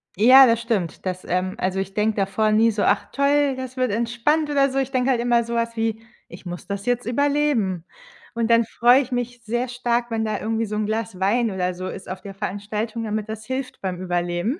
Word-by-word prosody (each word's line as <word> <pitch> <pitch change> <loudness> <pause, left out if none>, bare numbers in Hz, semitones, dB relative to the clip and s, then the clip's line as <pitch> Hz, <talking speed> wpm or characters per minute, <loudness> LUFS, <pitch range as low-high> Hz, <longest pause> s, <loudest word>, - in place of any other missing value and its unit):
Ja, 255 +7 +8
das 230 0 +2
stimmt. 210 -9 -2
Das, 185 0 -3
ähm 185 +1 -1
also, 190 +1 -1
ich 195 0 -4
denke 215 +1 +1
davor 210 +2 +1
nie 225 +2 +4
so: 205 -1 -1
„Ach 200 - +2
toll, 280 0 +2
das 260 0 -7
wird 255 -3 +1
entspannt,“ 240 +8 0
oder 275 -1 +3
so. 270 - 0
Ich 270 0 -2
denke 255 0 +1
halt 245 - +1
immer 240 -1 +2
so 235 +1 -6
was 230 0 -1
wie: 225 -1 -1 0.3
„Ich - - -12
muss 175 0 -7
das 200 0 -4
jetzt 245 0 0
überleben.“ 245 - 0 0.5
Und 230 0 -1
dann 230 0 +5
freue 245 +4 +4
ich 260 -1 -7
mich 245 0 -3
sehr 240 +3 -1
stark, 240 -1 -1
wenn 225 0 0
da 215 -2 -2
irgendwie 225 +1 -1
so 210 0 -5
'n 210 0 -1
Glas 220 -2 -3
Wein 220 +4 +1
oder 185 -1 -1
so 185 +1 -6
ist 190 - -8
auf 185 0 -6
der 195 0 -9
Veranstaltung, 210 +4 -4
damit 215 -1 -3
das 220 0 -6
hilft 260 +1 -5
beim 185 -2 -3
Überleben. 175 - -1
225 Hz, 225 wpm, -22 LUFS, 200-245 Hz, 0.5 s, Ja